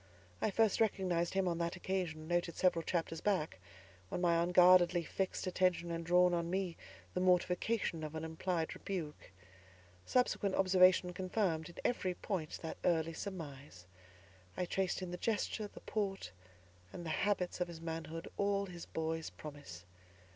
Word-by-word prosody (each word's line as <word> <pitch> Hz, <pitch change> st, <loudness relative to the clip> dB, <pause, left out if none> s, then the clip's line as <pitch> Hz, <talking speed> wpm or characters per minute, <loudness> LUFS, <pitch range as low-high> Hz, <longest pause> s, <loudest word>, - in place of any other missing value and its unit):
I -, -, +2 dB
first 220 Hz, +1 st, +2 dB
recognised 185 Hz, -5 st, +1 dB
him 195 Hz, -1 st, +2 dB
on 170 Hz, -1 st, 0 dB
that 170 Hz, +1 st, -1 dB
occasion, 175 Hz, -4 st, -3 dB
noted 175 Hz, 0 st, 0 dB
several 180 Hz, -2 st, +3 dB
chapters 165 Hz, -1 st, -2 dB
back, 170 Hz, -, 0 dB, 0.5 s
when -, -, -2 dB
my 170 Hz, -1 st, +3 dB
unguardedly 175 Hz, 0 st, +6 dB
fixed 190 Hz, +4 st, -2 dB
attention 180 Hz, -2 st, +1 dB
had 165 Hz, 0 st, -3 dB
drawn 180 Hz, +1 st, +5 dB
on 170 Hz, -1 st, 0 dB
me 185 Hz, -2 st, -1 dB, 0.4 s
the -, -, -1 dB
mortification 180 Hz, 0 st, +1 dB
of 155 Hz, 0 st, -5 dB
an 160 Hz, -, -4 dB
implied 160 Hz, +1 st, -2 dB
rebuke. 170 Hz, -7 st, -5 dB, 0.7 s
Subsequent 205 Hz, -, +1 dB
observation 185 Hz, -1 st, +5 dB
confirmed, 180 Hz, -3 st, -1 dB
in 175 Hz, -, -13 dB
every 185 Hz, -7 st, 0 dB
point, 175 Hz, -7 st, -3 dB
that 160 Hz, -, -5 dB
early 165 Hz, -1 st, +2 dB
surmise. 145 Hz, -, -7 dB, 0.7 s
I 180 Hz, -, 0 dB
traced 185 Hz, +1 st, -1 dB
in 180 Hz, -, -5 dB
the 180 Hz, -, -4 dB
gesture, 215 Hz, 0 st, -1 dB
the -, -, -13 dB
port, 195 Hz, -, -2 dB, 0.6 s
and 175 Hz, -, -7 dB
the 160 Hz, -, -2 dB
habits 185 Hz, -2 st, 0 dB
of 180 Hz, -, +1 dB
his 170 Hz, -2 st, -8 dB
manhood, 165 Hz, 0 st, -5 dB
all 200 Hz, 0 st, +1 dB
his 175 Hz, -3 st, -9 dB
boy's 160 Hz, 0 st, -2 dB
promise. 140 Hz, -, -10 dB
175 Hz, 155 wpm, -35 LUFS, 165-190 Hz, 0.7 s, unguardedly